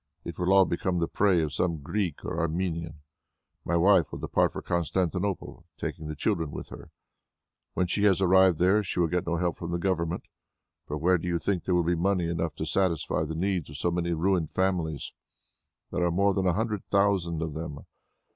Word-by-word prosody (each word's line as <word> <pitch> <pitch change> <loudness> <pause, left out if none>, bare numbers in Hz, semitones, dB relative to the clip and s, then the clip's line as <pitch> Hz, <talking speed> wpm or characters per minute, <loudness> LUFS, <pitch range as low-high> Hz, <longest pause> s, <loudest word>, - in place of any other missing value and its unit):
It 85 -2 -7
will 90 +1 +1
all 95 -1 +7
become 90 +1 -1
the 85 -1 +1
prey 95 -4 +2
of 75 -2 -3
some 80 -2 -1
Greek 90 0 -2
or 80 - -3
Armenian. 85 -2 -2 0.6
My 85 - 0
wife 90 -1 +4
will - - -5
depart - - +1
for - - -5
Constantinople, 90 +2 -1 0.2
taking 80 - -4
the 75 - -5
children 80 +2 -1
with - - -7
her. - - -11 0.9
When 90 - +2
she 100 +4 0
has 95 -2 +4
arrived 95 -2 +5
there, 95 +5 +4
she 90 -2 -4
will 85 - +4
get 90 0 -1
no 85 - +1
help 85 0 -1
from 85 - -6
the 85 - -1
Government, 85 -2 -1 0.6
for 75 - -3
where 90 +4 +3
do 90 - -5
you 85 -1 +1
think 90 +2 -2
there 90 - +1
will 85 - +3
be 85 +2 +1
money 90 0 +1
enough 85 -3 -2
to 80 - -4
satisfy 85 -2 0
the 80 +1 -5
needs 90 -2 -1
of 70 - -8
so 85 +4 0
many 85 0 -1
ruined 85 -1 +1
families? 90 -5 -1 0.8
There - - 0
are 85 - +3
more 100 +3 +2
than 95 -1 0
a 90 - +3
hundred 105 +1 -2
thousand 95 -5 +1
of 80 -2 -4
them. 75 -2 -6
85 Hz, 205 wpm, -27 LUFS, 80-95 Hz, 0.9 s, all